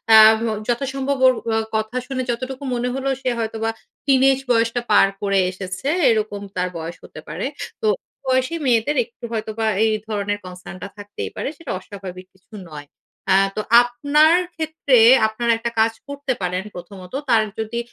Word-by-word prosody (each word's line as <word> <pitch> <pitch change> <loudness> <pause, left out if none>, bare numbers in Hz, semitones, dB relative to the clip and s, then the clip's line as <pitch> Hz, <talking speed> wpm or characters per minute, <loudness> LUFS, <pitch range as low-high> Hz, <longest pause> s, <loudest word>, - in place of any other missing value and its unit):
আ - - +11 0.2
ভ - - -2 0.2
যথাসম্ভব 270 +2 -1
ওর 255 - +7 0.2
আ - - +2 0.2
কথা 220 +3 -1
শুনে 265 -1 -2
যতটুকু 255 +3 -5
মনে 245 +1 -1
হল, 270 0 -4 0.2
সে 255 - 0
হয়তোবা 225 0 -2 0.4
টিনেজ 270 -1 +4
বয়সটা 230 0 +2
পার 205 - +6
করে 200 -1 +2
এসেছে, 190 +6 -6 0.2
এরকম 215 -2 0
তার 180 0 0
বয়স 165 +1 -6
হতে - - -11
পারে। - - -4 0.4
তো 440 - +2 0.4
বয়সী 260 +4 +1
মেয়েদের 255 +4 +2
একটু 235 - -30
হয়তো 220 -1 -3
বা 220 - +1 0.2
এই 220 - +2 0.2
ধরনের 205 -1 -2
কনসার্নটা 185 +1 -8
থাকতেই 205 0 -6
পারে, - - -3
সেটা 330 - -7
অস্বাভাবিক 185 -1 -9
কিছু 190 +3 -28 0.2
নয়। 145 -2 -9 0.5
আ - - +6 0.2
তো 215 - -1 0.2
আপনার 290 +6 +3 0.2
ক্ষেত্রে 315 -4 +1 0.3
আপনারা 235 +2 -1
একটা 235 +1 -3
কাজ 225 +1 +3
করতে 280 -1 -2
পারেন 180 +1 -1
প্রথমত। 180 +2 -10 0.2
তার 225 -2 +5 0.2
যদি 220 +2 -2
225 Hz, 165 wpm, -21 LUFS, 200-260 Hz, 0.5 s, আ